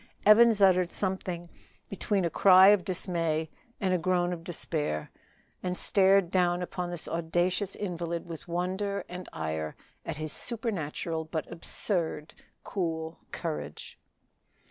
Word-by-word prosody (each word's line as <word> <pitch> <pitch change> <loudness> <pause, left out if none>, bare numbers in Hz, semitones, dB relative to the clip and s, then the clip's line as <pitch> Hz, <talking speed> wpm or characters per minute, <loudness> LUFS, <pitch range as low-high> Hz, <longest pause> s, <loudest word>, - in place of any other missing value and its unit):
Evans 215 0 +7
uttered 185 -2 +4
something 185 -3 -3 0.4
between 200 -1 -1
a - - +1
cry 190 +2 +8
of 205 -3 +5
dismay 165 -4 -1 0.3
and 190 -3 +1
a 180 - +2
groan 180 +1 +1
of 165 -1 -7
despair, 155 - -3 0.5
and 180 0 -2
stared 195 -2 +3
down 180 -1 +2
upon 180 0 -4
this 175 -2 -4
audacious 175 +4 0
invalid 170 -3 -3
with 165 -2 -9
wonder 190 +3 -2
and 180 0 -8
ire 80 -1 -3 0.3
at - - -4
his 155 -1 -4
supernatural 170 -8 -3
but 160 0 -4
absurd 170 -2 -1 0.3
cool 165 -3 -3
courage. 75 0 -5
175 Hz, 125 wpm, -29 LUFS, 165-190 Hz, 0.5 s, cry